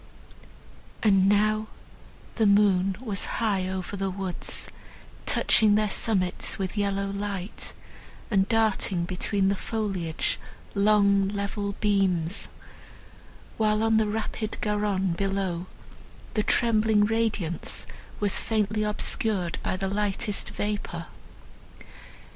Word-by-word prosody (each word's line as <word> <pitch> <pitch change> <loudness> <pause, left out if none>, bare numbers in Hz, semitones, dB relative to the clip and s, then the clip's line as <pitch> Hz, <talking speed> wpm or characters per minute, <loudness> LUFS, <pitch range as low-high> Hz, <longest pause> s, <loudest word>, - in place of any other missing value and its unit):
And 195 -3 +5
now 215 +1 +2 0.7
the 220 -2 +2
moon 195 -2 +4
was 215 -6 -2
high 200 -5 +1
over 190 +1 -4
the 195 0 -1
woods, 185 -1 -3 0.6
touching 210 -2 +4
their 210 -1 +2
summits 185 -5 0
with 190 0 -3
yellow 200 -1 0
light, 200 -1 -5 0.6
and 195 -2 +3
darting 215 -6 +1
between 190 +2 0
the 200 - +2
foliage 195 -7 -2 0.3
long 200 -1 +4
level 200 0 -2
beams; 195 -4 +1 1.1
while 215 0 +2
on 225 0 +4
the 220 -1 +3
rapid 215 0 -3
Garonne 205 -3 0
below 190 -1 -1 0.7
the 215 - +2
trembling 220 -2 +3
radiance 215 -6 -1 0.3
was 205 -2 +1
faintly 215 -1 0
obscured 210 -3 0
by - - -1
the 195 +1 -2
lightest 205 0 -1
vapour. 205 0 -3
200 Hz, 105 wpm, -27 LUFS, 190-215 Hz, 1.1 s, And